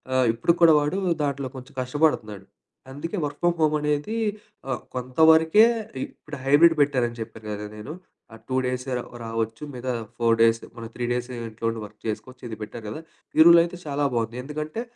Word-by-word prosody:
ఆహ్, 130 Hz, -1 st, +4 dB
ఇప్పుడు 165 Hz, +9 st, +2 dB
కూడా 160 Hz, -2 st, +8 dB
వాడు 150 Hz, +7 st, -1 dB, 0.3 s
దాంట్లో 140 Hz, -2 st, -3 dB
కొంచెం 130 Hz, +1 st, -11 dB
కష్టపడతనాడు. 125 Hz, -8 st, 0 dB, 0.5 s
అందుకే 165 Hz, +8 st, -5 dB
వర్క్ 145 Hz, 0 st, -4 dB
ఫ్రమ్ 175 Hz, -1 st, +2 dB
హోమ్ 155 Hz, -1 st, +3 dB
అనేది 150 Hz, +8 st, -1 dB, 0.5 s
ఆహ్, 130 Hz, -, -2 dB, 0.2 s
కొంతవరకే 160 Hz, -, +5 dB, 0.4 s
ఇ -, -, 0 dB, 0.2 s
ఇప్పుడు 150 Hz, -1 st, -9 dB
హైబ్రిడ్ 165 Hz, +4 st, +6 dB
పెట్టారని 125 Hz, -4 st, -1 dB
చెప్పారు 110 Hz, -1 st, -9 dB
కదా 105 Hz, 0 st, -5 dB
నేను. 105 Hz, +8 st, -7 dB, 0.4 s
ఆహ్, 115 Hz, -, -12 dB
టూ 130 Hz, -, -2 dB
డేసే 125 Hz, +1 st, -3 dB, 0.2 s
ఒ -, -, -11 dB
రావచ్చు. 115 Hz, +2 st, -3 dB
మిగతా 125 Hz, +1 st, -3 dB, 0.3 s
4 115 Hz, -1 st, +3 dB
డేస్. 115 Hz, 0 st, +4 dB
మనం 115 Hz, -2 st, -7 dB
3 120 Hz, -, -2 dB
డేస్ 125 Hz, +1 st, -2 dB
ఇంట్లో 115 Hz, -1 st, -6 dB
ఉండి 115 Hz, -1 st, -4 dB
వర్క్ 105 Hz, +1 st, -16 dB
చేసుకోచ్చు. 125 Hz, +4 st, -5 dB
ఇది 110 Hz, -, -6 dB
పెట్టారు 110 Hz, +1 st, -7 dB
కదా. 110 Hz, -, -6 dB, 0.4 s
ఈ -, -, +4 dB
రూల్ 170 Hz, 0 st, +9 dB
అయితే 175 Hz, +1 st, -6 dB
చాలా 145 Hz, 0 st, -1 dB
బావుంది. 115 Hz, +1 st, -1 dB
ఎందుకంటే 155 Hz, -, -4 dB
130 Hz, 180 wpm, -25 LUFS, 115-150 Hz, 0.5 s, రూల్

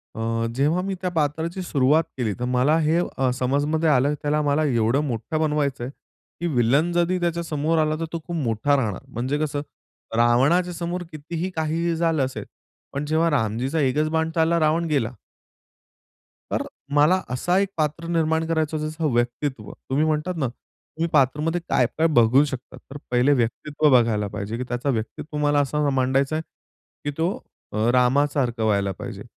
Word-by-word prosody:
अ, 115 Hz, +1 st, -1 dB
जेव्हा 150 Hz, +7 st, +2 dB
मी 195 Hz, -, -2 dB
त्या 180 Hz, -, -1 dB
पात्राची 160 Hz, +3 st, -1 dB
सुरुवात 150 Hz, +1 st, +3 dB
केली, 110 Hz, -5 st, -1 dB
तर 125 Hz, -, -1 dB
मला 130 Hz, +5 st, +2 dB
हे 160 Hz, +2 st, +2 dB, 0.3 s
समजमध्ये 145 Hz, +5 st, +1 dB
आलं, 140 Hz, +1 st, +3 dB
त्याला 150 Hz, +1 st, +1 dB
मला 145 Hz, +1 st, +1 dB
एवढं 120 Hz, +1 st, +2 dB
मोठं 130 Hz, +7 st, -3 dB
बनवायचंय, 145 Hz, -5 st, 0 dB, 0.5 s
की 175 Hz, -, -1 dB
विलन 140 Hz, +9 st, +3 dB
जरी 175 Hz, +1 st, +1 dB
त्याच्या 170 Hz, 0 st, -1 dB
समोर 160 Hz, +1 st, 0 dB
आला, 155 Hz, 0 st, +2 dB
तर 165 Hz, -, -1 dB
तो 165 Hz, -, -2 dB
खूप 170 Hz, -, -4 dB
मोठा 125 Hz, +1 st, +1 dB
राहणार. 105 Hz, -8 st, -1 dB
म्हणजे 130 Hz, +5 st, -2 dB
कसं? 145 Hz, -2 st, -1 dB, 0.6 s
रावणाच्या 140 Hz, +10 st, +3 dB
समोर 175 Hz, +1 st, -3 dB
कितीही 165 Hz, +4 st, -4 dB
काहीही 165 Hz, +2 st, 0 dB
झालं 160 Hz, -4 st, +1 dB
असेल, 130 Hz, -, -6 dB, 0.5 s
पण 140 Hz, +2 st, -2 dB
जेव्हा 160 Hz, +2 st, +2 dB
रामजीचा 130 Hz, +4 st, 0 dB
एकच 150 Hz, +3 st, +1 dB
बाण 160 Hz, 0 st, 0 dB
चालला, 165 Hz, +1 st, +3 dB
रावण 160 Hz, +2 st, +2 dB
गेला. 130 Hz, -5 st, 0 dB, 1.4 s
तर -, -, 0 dB, 0.3 s
मला 160 Hz, +6 st, +4 dB
असं 175 Hz, +9 st, 0 dB
एक 200 Hz, 0 st, +2 dB
पात्र 155 Hz, +2 st, -1 dB
निर्माण 160 Hz, -1 st, +1 dB
करायचं, 160 Hz, -1 st, 0 dB
जसं 155 Hz, -1 st, -2 dB
व्यक्तित्व 120 Hz, -1 st, -1 dB, 0.2 s
तुम्ही 145 Hz, +4 st, +2 dB
म्हणतात 155 Hz, +3 st, -1 dB
ना, 135 Hz, -4 st, 0 dB
तुम्ही 160 Hz, +6 st, -7 dB
पात्रामध्ये 150 Hz, +5 st, +2 dB
काय-काय 130 Hz, +6 st, +2 dB
बघू 130 Hz, -1 st, +5 dB
शकता? 130 Hz, -3 st, -7 dB
तर 140 Hz, -, -11 dB
पहिले 125 Hz, +4 st, +4 dB
व्यक्तित्व 145 Hz, +5 st, +1 dB
बघायला 115 Hz, -4 st, +3 dB
पाहिजे, 105 Hz, +3 st, -4 dB
की 125 Hz, -, -3 dB
त्याचं 125 Hz, +3 st, -1 dB
व्यक्तित्व 115 Hz, +7 st, -5 dB
मला 145 Hz, 0 st, +2 dB
असं 145 Hz, +2 st, 0 dB
मला 145 Hz, -1 st, +2 dB
मांडायचं 135 Hz, +3 st, +1 dB
आहे 160 Hz, -, -1 dB, 0.6 s
की 145 Hz, -, 0 dB
तो 165 Hz, +2 st, +1 dB, 0.5 s
अ, -, -, -1 dB
रामासारखं 125 Hz, -1 st, +2 dB
व्हायला 100 Hz, -2 st, +1 dB
पाहिजे. 105 Hz, -1 st, -7 dB
145 Hz, 165 wpm, -23 LUFS, 125-160 Hz, 1.4 s, बघू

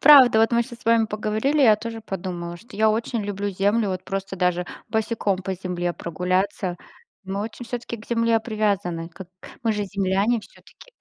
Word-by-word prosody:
Правда, 270 Hz, -6 st, +9 dB
вот 225 Hz, +1 st, +3 dB
мы 235 Hz, 0 st, +4 dB
щас 235 Hz, 0 st, -10 dB
с -, -, -19 dB
вами 230 Hz, -1 st, +4 dB
поговорили, 215 Hz, +8 st, +1 dB
я 220 Hz, -4 st, +7 dB
тоже 225 Hz, +1 st, -6 dB
подумала, 175 Hz, -4 st, -5 dB
что 230 Hz, +5 st, -14 dB
я 220 Hz, +1 st, +4 dB
очень 225 Hz, 0 st, -1 dB
люблю 205 Hz, 0 st, -2 dB
землю, 205 Hz, +3 st, +1 dB
вот 185 Hz, -1 st, -3 dB
просто 195 Hz, 0 st, -4 dB
даже 180 Hz, -1 st, +1 dB, 0.2 s
босиком 220 Hz, -3 st, 0 dB
по 190 Hz, 0 st, -2 dB
земле 175 Hz, -1 st, -2 dB
прогуляться. 185 Hz, +2 st, -1 dB, 0.5 s
Мы 195 Hz, +1 st, -3 dB
очень 225 Hz, +3 st, -5 dB
всё-таки 240 Hz, 0 st, -4 dB
к 215 Hz, -, -13 dB
Земле 230 Hz, -1 st, +2 dB
привязаны, 200 Hz, -7 st, -1 dB
как 180 Hz, +1 st, -10 dB, 0.3 s
мы 225 Hz, -2 st, +2 dB
же 210 Hz, -1 st, -1 dB
земляне 200 Hz, +3 st, +1 dB
всё-таки. -, -, -18 dB
205 Hz, 180 wpm, -24 LUFS, 185-230 Hz, 0.5 s, Правда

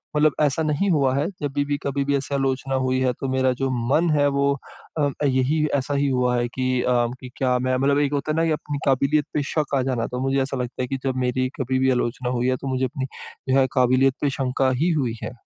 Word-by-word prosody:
मतलब 150 Hz, 0 st, +4 dB
ऐसा 150 Hz, +2 st, +2 dB
नहीं 155 Hz, +6 st, 0 dB
हुआ 140 Hz, -5 st, +2 dB
है, 140 Hz, +2 st, +1 dB, 0.2 s
जब 145 Hz, -2 st, -2 dB
भी 145 Hz, 0 st, 0 dB
कभी 140 Hz, 0 st, -1 dB
भी 140 Hz, 0 st, +1 dB
ऐसी 140 Hz, +1 st, -3 dB
आलोचना 135 Hz, 0 st, -1 dB
हुई 130 Hz, 0 st, +1 dB
है 130 Hz, -1 st, +2 dB
तो 135 Hz, -, -3 dB
मेरा 130 Hz, 0 st, +2 dB
जो 135 Hz, 0 st, 0 dB, 0.2 s
मन 165 Hz, +5 st, +3 dB
है 145 Hz, -1 st, +3 dB
वो 140 Hz, 0 st, +3 dB, 0.5 s
अ, 145 Hz, -1 st, +2 dB, 0.2 s
यही 140 Hz, +3 st, +2 dB
ऐसा 140 Hz, +1 st, -1 dB
ही 140 Hz, 0 st, +1 dB
हुआ 125 Hz, -1 st, +1 dB
है 120 Hz, 0 st, 0 dB
कि 130 Hz, -1 st, 0 dB
अ, 120 Hz, -1 st, +2 dB, 0.3 s
क्या 125 Hz, -2 st, +2 dB
मैं 130 Hz, +1 st, 0 dB
मतलब 140 Hz, +2 st, +2 dB
एक 145 Hz, 0 st, +1 dB
होता 145 Hz, +2 st, -1 dB
है -, -, -1 dB
ना 165 Hz, -, +2 dB
की 165 Hz, -, +1 dB
अपनी 150 Hz, -1 st, -3 dB
काबिलियत 140 Hz, +2 st, +2 dB
पे 150 Hz, -, 0 dB
शक 150 Hz, -3 st, 0 dB
आ -, -, +2 dB
जाना। 125 Hz, -3 st, -1 dB
तो 125 Hz, -, -3 dB
मुझे 135 Hz, +1 st, +1 dB
ऐसा 135 Hz, 0 st, -3 dB
लगता 125 Hz, 0 st, -4 dB
है -, -, -3 dB
कि 135 Hz, -, -2 dB
जब 130 Hz, -1 st, -1 dB
मेरी 130 Hz, +1 st, 0 dB
कभी 130 Hz, 0 st, 0 dB
भी 130 Hz, 0 st, +3 dB
आलोचना 125 Hz, 0 st, -1 dB
हुई 125 Hz, -, +1 dB
है 130 Hz, -, +2 dB
तो 140 Hz, -, -5 dB
मुझे 130 Hz, 0 st, 0 dB
अपनी 130 Hz, +1 st, -4 dB, 0.4 s
जो 135 Hz, +1 st, +4 dB
है 130 Hz, -, +3 dB
काबिलियत 130 Hz, +1 st, +3 dB
पे 145 Hz, -, +2 dB
शंका 130 Hz, 0 st, +1 dB
ही 170 Hz, -, +3 dB
हुई 120 Hz, -3 st, -2 dB
है। -, -, -4 dB
135 Hz, 250 wpm, -23 LUFS, 130-145 Hz, 0.5 s, मतलब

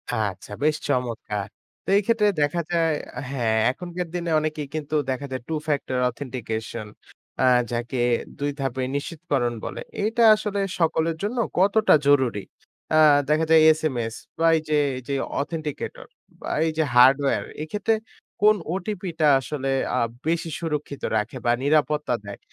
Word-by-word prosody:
আচ্ছা, 105 Hz, -2 st, -3 dB
বেশ 155 Hz, 0 st, +3 dB
চমৎকার! 115 Hz, -6 st, -2 dB, 0.4 s
তো -, -, -38 dB
এই -, -, +3 dB
ক্ষেত্রে 225 Hz, -3 st, +3 dB
দেখা 145 Hz, +4 st, +1 dB
যায়, 165 Hz, -2 st, +2 dB, 0.4 s
হ্যাঁ, 115 Hz, -5 st, 0 dB
এখনকার 175 Hz, +3 st, -5 dB
দিনে 170 Hz, -2 st, -2 dB
অনেকেই 155 Hz, -2 st, -3 dB
কিন্তু 155 Hz, 0 st, -3 dB
দেখা 130 Hz, +2 st, -2 dB
যায় 130 Hz, -2 st, -3 dB
2 160 Hz, -1 st, -2 dB
factor 140 Hz, -3 st, -1 dB
authentication 115 Hz, -4 st, -5 dB, 0.6 s
আ -, -, +3 dB, 0.3 s
যাকে 120 Hz, +2 st, -3 dB, 0.4 s
২ 145 Hz, 0 st, -1 dB
ধাপে 130 Hz, -1 st, -2 dB
নিশ্চিতকরণ 145 Hz, -5 st, -2 dB
বলে। -, -, -5 dB, 0.2 s
এটা 230 Hz, +2 st, +2 dB
আসলে 210 Hz, -1 st, -3 dB, 0.2 s
সকলের 165 Hz, 0 st, +1 dB
জন্য 235 Hz, +5 st, -2 dB, 0.2 s
কতটা 205 Hz, +3 st, +4 dB
জরুরি? 130 Hz, -8 st, +3 dB, 0.5 s
আ -, -, +5 dB, 0.3 s
দেখা 155 Hz, +1 st, +3 dB
যায় 160 Hz, -1 st, +7 dB
এসএমএস 125 Hz, -8 st, -2 dB, 0.2 s
বা 165 Hz, -, +2 dB
এই -, -, -2 dB
যে 150 Hz, -, +2 dB, 0.2 s
এই -, -, -6 dB
যে -, -, 0 dB, 0.3 s
authenticator 155 Hz, 0 st, -5 dB, 0.3 s
বা -, -, -5 dB, 0.2 s
এই -, -, 0 dB
যে 160 Hz, -, +3 dB
hardware 135 Hz, +3 st, +5 dB, 0.2 s
এক্ষেত্রে 210 Hz, +7 st, 0 dB, 0.5 s
কোন 215 Hz, 0 st, +6 dB, 0.2 s
ওটিপি 190 Hz, -1 st, -4 dB
টা 155 Hz, -, +4 dB
আসলে 135 Hz, 0 st, -4 dB, 0.3 s
আ -, -, +1 dB, 0.3 s
বেশি 165 Hz, 0 st, 0 dB
সুরক্ষিত 150 Hz, -4 st, -4 dB, 0.2 s
রাখে 105 Hz, +5 st, -3 dB
বা 120 Hz, -, +4 dB
নিরাপত্তা 150 Hz, -2 st, +2 dB
দেয়? 100 Hz, -1 st, -8 dB
150 Hz, 150 wpm, -24 LUFS, 130-165 Hz, 0.6 s, যায়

